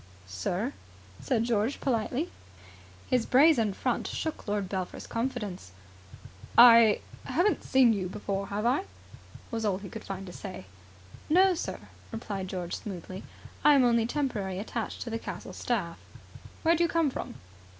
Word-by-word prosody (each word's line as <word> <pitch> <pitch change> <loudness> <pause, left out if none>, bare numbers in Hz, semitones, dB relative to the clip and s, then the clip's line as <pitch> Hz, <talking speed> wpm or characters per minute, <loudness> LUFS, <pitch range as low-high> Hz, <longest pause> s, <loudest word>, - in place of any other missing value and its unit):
"Sir?" 175 - -2 0.5
said 230 -4 0
George 230 +2 0
politely. 255 +5 -1 0.8
His 250 -3 +1
brazen 260 -5 +5
front - - -1
shook 315 -7 -4
Lord 205 -2 -1
Belpher's 185 -1 -4
confidence. 215 - -4 0.8
"I 230 -3 +8 0.2
haven't 400 +4 +1
seen 255 -3 +5
you 185 -3 -2
before 195 0 -3
here, 200 - -6
have 210 - -1
I?" 265 +10 +2 0.7
was 225 -1 -2
all 200 -3 +1
he 195 0 -9
could 220 - -8
find 195 0 -6
to 180 - -9
say. 185 - -8 0.6
"No, 370 +4 +5
sir," 340 - -4 0.3
replied 205 -4 -4
George 180 -2 -4
smoothly. 185 -1 -7 0.4
"I 295 -1 +7
am 270 - +5
only 235 -2 +3
temporarily 225 -10 -2
attached 225 +3 -4
to 235 - -6
the 225 - -2
castle - - -7
staff." 195 -9 -2 0.6
"Where 335 +1 +5
do 340 - +2
you 340 - +2
come 325 -4 +2
from?" - - -6
225 Hz, 150 wpm, -29 LUFS, 195-260 Hz, 0.8 s, I